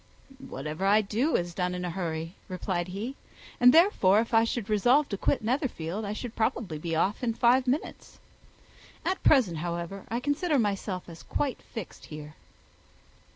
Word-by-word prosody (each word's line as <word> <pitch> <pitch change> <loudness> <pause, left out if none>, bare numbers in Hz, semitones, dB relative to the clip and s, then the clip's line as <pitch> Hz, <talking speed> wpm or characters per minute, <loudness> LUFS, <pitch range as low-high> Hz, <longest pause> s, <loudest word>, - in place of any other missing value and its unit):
"Whatever 155 - -5
I 210 +2 +5
do 225 +9 0
is 175 0 -1
done 180 0 -1
in 180 0 -3
a 175 - -2
hurry," 165 -2 -3
replied 185 -1 -2
he; 210 +9 -5 0.4
"and 250 0 +8
therefore 260 - +5
if 230 +1 -2
I 225 0 +5
should 230 -2 -3
resolve 245 +8 +3
to 200 - -2
quit - - 0
Netherfield, 220 - -2
I 200 - -3
should 235 +1 -6
probably 215 -7 -1
be 165 +1 -2
off 195 +6 +1
in 230 -2 0
five 250 +2 +4
minutes. 270 +5 -3 0.9
At 375 - 0
present, 230 - +4
however, 170 +3 -4
I 235 - -1
consider 290 +4 +1
myself 200 -4 -1
as 165 -2 -10
quite 280 -3 -2
fixed 225 -7 -9
here." 150 -1 -9
205 Hz, 165 wpm, -28 LUFS, 175-245 Hz, 0.9 s, and